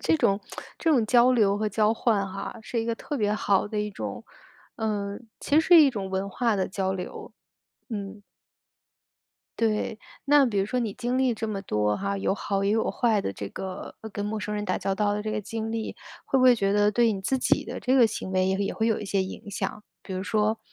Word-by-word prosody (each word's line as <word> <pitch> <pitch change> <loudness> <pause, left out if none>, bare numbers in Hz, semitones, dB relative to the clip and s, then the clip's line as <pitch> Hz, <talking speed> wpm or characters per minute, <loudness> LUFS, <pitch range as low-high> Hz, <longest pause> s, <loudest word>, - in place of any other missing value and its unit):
这 160 0 +3
种 195 +4 +2 0.4
这 325 - +1
种 250 -8 +4
交 245 +2 +5
流 205 -4 +3
和 215 0 0
交 215 +2 +2
换 215 -4 +1
哈， 195 +3 -6
是 230 +1 -2
一 - - -3
个 230 0 -1
特 290 - -5
别 210 -3 +1
好 205 -2 +1
的 210 0 -2
一 210 - -2
种 195 - -6 0.5
呃， 205 -2 -2 0.2
其 285 - -1
实 - - +7
是 345 -3 +9
一 290 - +7
种 195 -5 -5
文 190 +1 -2
化 230 +2 0
的 190 - 0
交 190 0 -1
流， 180 -1 -7 0.6
嗯。 205 -2 -6 1.4
对， 220 -1 0 0.3
那 285 -1 +6
比 210 -5 -1
如 195 - +1
说 250 +4 -1
你 215 -4 -2
经 250 +1 -2
历 260 -2 +2
这 225 0 -4
么 200 -2 -3
多 105 - 0
哈， 200 0 -2
有 195 - 0
好 195 -1 -2
也 200 - +2
有 220 0 +1
坏 225 -5 +2
的 - - -2
这 100 +1 -6
个， 190 -1 -7
呃， 220 - -7
跟 205 0 -4
陌 215 +1 -2
生 210 0 -4
人 210 0 -2
打 185 - 0
交 195 - -1
道 205 0 +1
的 210 - -2
这 215 - -2
个 215 - -1
经 225 +1 -4
历， 225 -1 -3 0.3
会 270 - +1
不 255 - +3
会 250 -1 +8
觉 200 -3 +1
得 205 0 +3
对 230 0 +3
你 195 - -5
自 265 +7 0
己 - - +2
的 - - -6
这 260 +1 +1
个 245 -3 +7
行 205 -3 -4
为 185 0 +2
也 190 - +1
也 200 - -1
会 220 - 0
有 225 -2 +1
一 210 - -5
些 195 -1 +1
影 190 +2 -8
响？ 210 +1 -4 0.2
比 190 - -7
如 185 - -2
说 215 +1 0
210 Hz, 260 characters per minute, -26 LUFS, 195-230 Hz, 1.4 s, 是